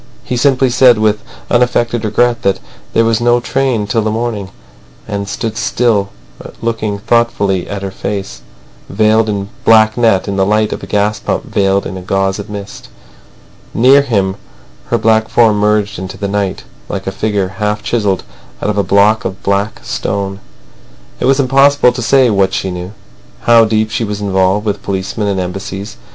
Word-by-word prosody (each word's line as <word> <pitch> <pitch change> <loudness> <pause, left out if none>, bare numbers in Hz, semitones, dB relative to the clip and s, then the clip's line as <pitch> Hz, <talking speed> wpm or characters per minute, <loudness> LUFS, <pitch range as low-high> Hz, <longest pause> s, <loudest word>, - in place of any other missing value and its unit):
He 125 - -3
simply 130 0 +2
said 125 -1 +5
with 105 -1 +1 0.3
unaffected 120 -1 +1
regret 120 +2 +1
that 100 -1 +1 0.3
there 115 - +3
was 115 0 +1
no 120 0 +3
train 125 -3 -1
till 110 +2 0
the 110 - -1
morning, 110 -3 -3 0.6
and 100 -1 -4
stood 110 +1 -3 1.1
looking 115 -3 -2
thoughtfully 100 -4 0
at 100 -1 -5
her 95 - -4
face, 95 -12 -5 0.5
veiled 110 +2 +2
in 100 -1 -3
black 110 0 +5
net, 110 -6 +2
in 100 -1 -2
the 95 - +3
light 105 +2 +1
of - - -6
a - - -8
gas 105 +1 0
lamp - - 0
veiled 100 0 +1
in 95 - -5
a - - -7
gauze 95 +1 -1
of 100 +1 -7
mist. 100 -1 -8 0.9
Near 130 +4 +6
him, 100 -8 -1 0.5
her - - +1
black 110 0 +2
form 110 -3 +3
merged 105 -2 +1
in 95 - -5
the 95 +1 -5
night, 100 -1 -2 0.3
like 95 -1 -4
a 95 - -2
figure 100 -1 -1
half 105 0 -1
chiselled 105 -5 0 0.4
out 105 - -1
of 105 - -2
a - - +2
block 105 +3 +3
of 95 +1 -5
black 100 +2 -1
stone. 100 0 -3 0.8
It - - -1
was 135 +1 +3
impossible 135 0 +4
to 120 0 -5
say 125 +1 +3
what 95 -2 +1
she 95 - -2
knew, 90 +2 -6 0.5
how 115 -1 +5
deep 110 0 0
she 120 - -1
was 105 -1 -3
involved 95 +1 +1
with 105 -1 -2
policemen 100 +2 -3
and 100 -2 -1
Embassies. 95 +2 -5
105 Hz, 175 wpm, -14 LUFS, 100-115 Hz, 1.1 s, Near